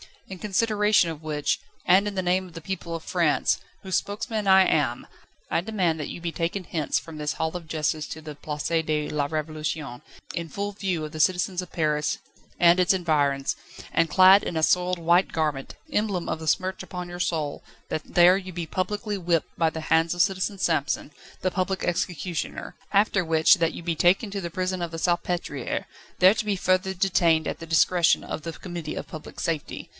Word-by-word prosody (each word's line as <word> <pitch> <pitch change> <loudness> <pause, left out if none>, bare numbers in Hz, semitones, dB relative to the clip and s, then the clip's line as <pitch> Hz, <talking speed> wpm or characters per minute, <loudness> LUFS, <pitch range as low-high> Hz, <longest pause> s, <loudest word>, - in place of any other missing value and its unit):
In 190 -1 -8
consideration 210 -2 +2
of 160 -2 -7
which, 150 -2 -1 0.3
and 190 +3 +5
in 205 - -4
the 190 - 0
name 185 +1 +1
of 175 - -15
the 165 - -8
people 170 -1 -4
of 165 - -6
France, 170 -5 +1 0.2
whose 190 -2 +1
spokesman 210 +1 -3
I 190 0 +7
am, 130 -8 +1 0.5
I - - +2
demand 180 -4 0
that 150 - -3
you - - -7
be 170 0 -2
taken 170 +4 -2
hence 160 -4 -1
from 165 -2 -7
this 150 -1 -2
Hall 160 +1 -2
of 170 -2 -6
Justice 155 -1 -1
to 160 - -7
the 155 -1 -7
Place 150 0 -5
de 150 -1 -1
la 145 -2 0
Révolution, 155 -3 -4 0.3
in 170 -1 -3
full 200 +5 -4
view 190 -5 -2
of 155 - -5
the 155 - -7
citizens 180 +2 +2
of 180 - -11
Paris 150 -2 0 0.4
and 175 +1 +6
its 180 +1 +4
environs, 145 -6 +1 0.3
and 165 -1 +2
clad 190 +4 +7
in - - -4
a 160 - 0
soiled 180 +1 +2
white 170 +3 +3
garment, 150 -4 -2 0.2
emblem 205 -7 -1
of - - -2
the 160 - -7
smirch 185 +4 0
upon 180 -1 -6
your 175 0 -7
soul, 155 -5 -1 0.3
that 155 - -2
there 180 +2 +5
you 185 -1 -7
be 170 -1 -4
publicly 205 +5 -2
whipped 170 -3 0
by 165 -1 +3
the 160 0 -6
hands 165 +2 +2
of 175 - +2
Citizen 195 +2 0
Samson, 155 -5 0 0.3
the 185 - 0
public 190 0 -1
executioner; 175 -1 -3 0.2
after 200 -2 +3
which, 160 +5 +5
that 165 -3 0
you - - -8
be 165 -1 -1
taken 185 +6 +3
to 200 - -3
the 170 - -4
prison 185 +1 -2
of 170 -1 -3
the 165 - -5
Salpêtriere, 175 -5 -1 0.4
there 185 +2 +7
to 220 - -3
be 205 -1 +1
further 185 +1 +1
detained 170 -4 +2
at - - -5
the 165 - -8
discretion 170 +1 +3
of - - -5
the 165 - -5
Committee 175 -4 -6
of - - -5
Public 155 - -9
Safety. 160 -3 -3
175 Hz, 200 wpm, -25 LUFS, 160-185 Hz, 0.5 s, I